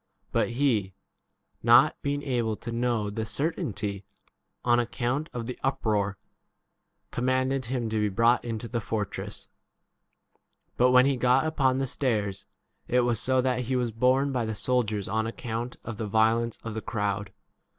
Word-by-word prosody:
But -, -, +1 dB
he, 110 Hz, -9 st, +1 dB, 0.7 s
not -, -, +6 dB
being 145 Hz, 0 st, -2 dB
able 120 Hz, -5 st, 0 dB
to 115 Hz, +2 st, -7 dB
know 115 Hz, -3 st, 0 dB
the 110 Hz, +2 st, -3 dB
certainty 110 Hz, -, -2 dB, 0.6 s
on 120 Hz, 0 st, +4 dB
account 125 Hz, +5 st, -1 dB
of 120 Hz, -2 st, -4 dB
the 125 Hz, +1 st, -6 dB
uproar, 105 Hz, -6 st, 0 dB, 0.9 s
commanded 130 Hz, +1 st, 0 dB
him 120 Hz, -1 st, -2 dB
to 110 Hz, -, 0 dB
be 105 Hz, 0 st, +2 dB
35 95 Hz, -, -6 dB
brought 115 Hz, +2 st, +4 dB
into 115 Hz, -1 st, -4 dB
the 115 Hz, +1 st, -2 dB
fortress. 105 Hz, -1 st, -4 dB, 1.3 s
But 125 Hz, +1 st, +4 dB
when 125 Hz, 0 st, +6 dB
he 140 Hz, -1 st, +2 dB
got 125 Hz, +4 st, +3 dB
upon 135 Hz, -5 st, +2 dB
the 135 Hz, -, 0 dB
stairs 105 Hz, -7 st, -1 dB, 0.4 s
it 125 Hz, +1 st, +3 dB
was 120 Hz, -3 st, +1 dB
so 130 Hz, 0 st, +2 dB
that 125 Hz, -1 st, 0 dB
he 130 Hz, +2 st, -1 dB
was 120 Hz, -2 st, 0 dB
borne 130 Hz, +5 st, +2 dB
by 125 Hz, -3 st, 0 dB
the 110 Hz, -1 st, -3 dB
soldiers 105 Hz, -1 st, 0 dB
on 110 Hz, +2 st, 0 dB
account 115 Hz, +1 st, -4 dB
of 115 Hz, -3 st, -6 dB
the 110 Hz, -, -3 dB
violence 115 Hz, +2 st, +2 dB
36 -, -, -11 dB
of 115 Hz, -, -4 dB
the 110 Hz, -, -4 dB
crowd. 100 Hz, -2 st, -2 dB
120 Hz, 165 wpm, -27 LUFS, 110-130 Hz, 1.3 s, not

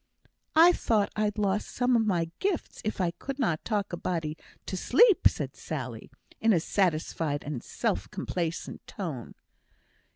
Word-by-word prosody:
"I 335 Hz, +3 st, +9 dB
thought 215 Hz, -9 st, +1 dB
I'd 210 Hz, 0 st, 0 dB
lost 205 Hz, 0 st, 0 dB
some 245 Hz, 0 st, +2 dB
of 230 Hz, -, +4 dB
my 170 Hz, -4 st, +1 dB
gifts 385 Hz, -4 st, -2 dB
if 215 Hz, -, -2 dB
I 180 Hz, -2 st, +1 dB
could 265 Hz, +10 st, -6 dB
not 170 Hz, -, 0 dB
talk 205 Hz, -4 st, -1 dB
a -, -, -1 dB
body 160 Hz, -4 st, -2 dB, 0.3 s
to -, -, -4 dB
sleep," 365 Hz, -, +5 dB
said -, -, -3 dB
Sally, -, -, -6 dB, 0.3 s
in 225 Hz, -1 st, +4 dB
a 175 Hz, -, +4 dB
satisfied 160 Hz, -4 st, 0 dB
and 140 Hz, -5 st, -4 dB
self -, -, -2 dB
complacent 170 Hz, -2 st, -3 dB
tone. 155 Hz, -, -6 dB
195 Hz, 155 wpm, -28 LUFS, 165-225 Hz, 0.3 s, I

